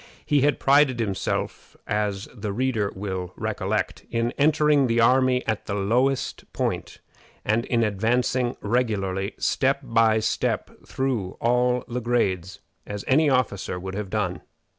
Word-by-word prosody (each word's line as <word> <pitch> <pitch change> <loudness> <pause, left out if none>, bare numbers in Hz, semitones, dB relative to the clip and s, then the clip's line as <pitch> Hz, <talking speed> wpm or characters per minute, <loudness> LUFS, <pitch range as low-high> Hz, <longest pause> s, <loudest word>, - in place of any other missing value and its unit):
He 145 -2 +3
had 145 +2 +2
prided 140 -3 +4
himself, 100 -4 -3
as 105 -1 -2
the 105 -3 -4
reader 115 -2 0
will 95 -2 -4
recollect, - - -2
in 115 0 0
entering 150 -2 +3
the 115 0 +1
army 125 +1 +3
at 110 -1 -2
the 100 - -2
lowest 125 +7 0
point, - - -2 0.5
and 110 +3 +1
in 115 -2 +1
advancing 120 +4 0
regularly, 100 -4 -1
step 135 +1 +1
by 115 -3 +3
step, 110 - -1 0.2
through 120 -9 -2
all 125 +1 +2
the 125 +1 -3
grades, 95 -7 -1 0.2
as 105 -1 -6
any 150 +3 +4
other 130 -2 +5
officer 100 -5 -6
would 95 +1 -6
have 100 -1 -4
done. 95 -4 -2
115 Hz, 140 wpm, -24 LUFS, 100-130 Hz, 0.5 s, other